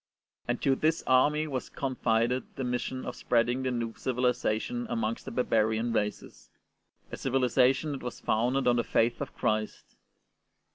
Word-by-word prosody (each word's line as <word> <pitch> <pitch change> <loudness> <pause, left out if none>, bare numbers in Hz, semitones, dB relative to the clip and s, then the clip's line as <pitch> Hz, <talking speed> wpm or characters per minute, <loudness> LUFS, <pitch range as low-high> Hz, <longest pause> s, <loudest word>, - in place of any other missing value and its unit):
And 120 0 -1
to 135 - +4
this 160 +4 +1
army 150 +4 +3
was 135 -4 -4
confided 125 -2 -1
the 135 - -3
mission 125 +1 -3
of 125 - -5
spreading 120 +2 +1
the 130 - -1
new 120 -2 -2
civiHzation 125 - -1
amongst 235 0 -2
the - - -6
barbarian 110 -1 +1
races— 105 -2 -3 0.6
a - - -4
civihzation 130 +2 +2
that 140 - -5
was 125 0 -6
founded 125 +4 +1
on 120 0 +4
the 120 - +2
Faith 115 +1 +1
of - - -5
Christ. 110 0 -2
125 Hz, 150 wpm, -29 LUFS, 115-135 Hz, 0.6 s, to